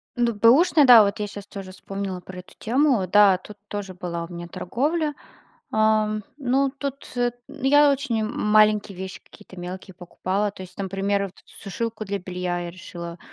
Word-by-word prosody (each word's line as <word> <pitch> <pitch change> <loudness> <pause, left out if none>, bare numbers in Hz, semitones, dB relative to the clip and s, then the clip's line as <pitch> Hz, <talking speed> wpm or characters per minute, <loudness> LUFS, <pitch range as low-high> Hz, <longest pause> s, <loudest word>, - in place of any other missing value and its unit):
Ну 240 -2 +1
бэушный, 280 - +5
да, 240 -4 +10
вот 200 +2 -1
я 210 - -2
сейчас 205 0 -9
тоже 195 -2 -8
вспомнила 195 0 -5
про 180 +1 -10
эту 180 - -14
тему, 250 -5 +2
да, 200 -1 +6
тут 205 +2 -13
тоже 205 -2 -5
была 170 -2 -5
у 175 - -11
меня 170 0 -7
торговля. 295 - -1 0.6
Ам, 215 -1 +2
ну, 270 0 +1
тут 280 -1 -5
эт 245 0 0
я 290 +1 +4
очень 260 -6 -1
маленькие 210 -2 +2
вещи 190 0 -7
какие-то - - -16
мелкие 185 +2 -7
покупала. 190 +3 -2
То 190 - -12
есть, 180 0 -13
например, 195 +1 -1
вот 190 - -10
эту - - -21
сушилку 220 +2 -4
для 200 0 -2
белья 180 -1 -3
я 170 0 -5
решила 170 -1 -9
205 Hz, 175 wpm, -24 LUFS, 185-240 Hz, 0.6 s, да